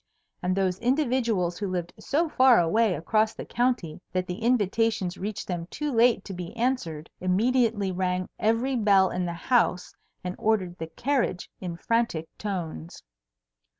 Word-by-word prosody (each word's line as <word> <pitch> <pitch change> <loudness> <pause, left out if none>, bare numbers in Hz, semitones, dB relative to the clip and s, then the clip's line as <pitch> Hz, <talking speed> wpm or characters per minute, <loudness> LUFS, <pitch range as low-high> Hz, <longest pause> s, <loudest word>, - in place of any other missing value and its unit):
And 180 +1 0
those 190 -1 +1
individuals 235 - +1
who 205 - -2
lived 175 -2 -3
so 325 +4 0
far 260 -5 +5
away 185 +4 +2
across 215 +8 +1
the - - -7
county 240 -11 -1
that 185 0 -1
the 180 +2 -5
invitations 225 -4 +1
reached 205 +2 -5
them 175 -2 -3
too 300 +10 -3
late 235 -4 +3
to 195 - -6
be 180 +5 -7
answered, 225 -11 -1
immediately 215 +1 +2
rang 185 0 -1
every 235 +4 +1
bell 200 -5 +4
in 180 0 -1
the 170 - -3
house 180 0 +1 0.3
and 180 0 -4
ordered 195 -5 +1
the 160 - -4
carriage 240 - -1
in 175 -3 -5
frantic 230 -8 -1
tones. 170 - -5
195 Hz, 150 wpm, -26 LUFS, 180-235 Hz, 0.3 s, far